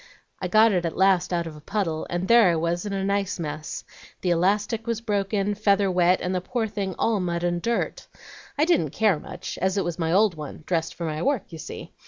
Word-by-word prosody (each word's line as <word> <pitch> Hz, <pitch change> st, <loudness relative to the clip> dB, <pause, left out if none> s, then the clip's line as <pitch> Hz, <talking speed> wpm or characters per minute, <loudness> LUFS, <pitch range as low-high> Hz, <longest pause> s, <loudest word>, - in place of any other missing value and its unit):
I 185 Hz, -, -1 dB
got 215 Hz, +4 st, +5 dB
it 180 Hz, -3 st, +1 dB
at 165 Hz, -, -3 dB
last 190 Hz, -2 st, +3 dB
out 170 Hz, -1 st, 0 dB
of 160 Hz, -2 st, -7 dB
a 150 Hz, -, -12 dB
puddle, 165 Hz, -3 st, -2 dB
and 175 Hz, +2 st, -2 dB
there 230 Hz, -5 st, +6 dB
I 170 Hz, -, +2 dB
was 170 Hz, +4 st, -1 dB
in 200 Hz, -, -3 dB
a 195 Hz, -1 st, -1 dB
nice 200 Hz, -1 st, -1 dB
mess. 155 Hz, -1 st, -5 dB, 0.4 s
The 180 Hz, -, +1 dB
elastic 205 Hz, +6 st, +1 dB
was 230 Hz, -2 st, -1 dB
broken, 205 Hz, -2 st, 0 dB
feather 200 Hz, -2 st, +2 dB
wet, 180 Hz, 0 st, +3 dB
and 180 Hz, +1 st, -1 dB
the 180 Hz, -, 0 dB
poor 225 Hz, +4 st, -2 dB
thing 195 Hz, -3 st, -4 dB
all 225 Hz, -3 st, +1 dB
mud 175 Hz, -1 st, -2 dB
and 175 Hz, 0 st, 0 dB
dirt. 235 Hz, +4 st, -2 dB, 0.5 s
I 300 Hz, -, +4 dB
didn't 345 Hz, -2 st, +2 dB
care 210 Hz, -8 st, +2 dB
much, 180 Hz, +3 st, -7 dB
as 190 Hz, +2 st, 0 dB
it 195 Hz, -, +2 dB
was 175 Hz, 0 st, -3 dB
my 165 Hz, -1 st, 0 dB
old 200 Hz, +2 st, +4 dB
one, 155 Hz, -1 st, -8 dB
dressed 165 Hz, -2 st, -1 dB
for 170 Hz, -, -4 dB
my 155 Hz, -1 st, -3 dB
work, 265 Hz, -7 st, -1 dB
you 165 Hz, -, -8 dB
see. -, -, -8 dB
185 Hz, 235 wpm, -25 LUFS, 170-205 Hz, 0.5 s, there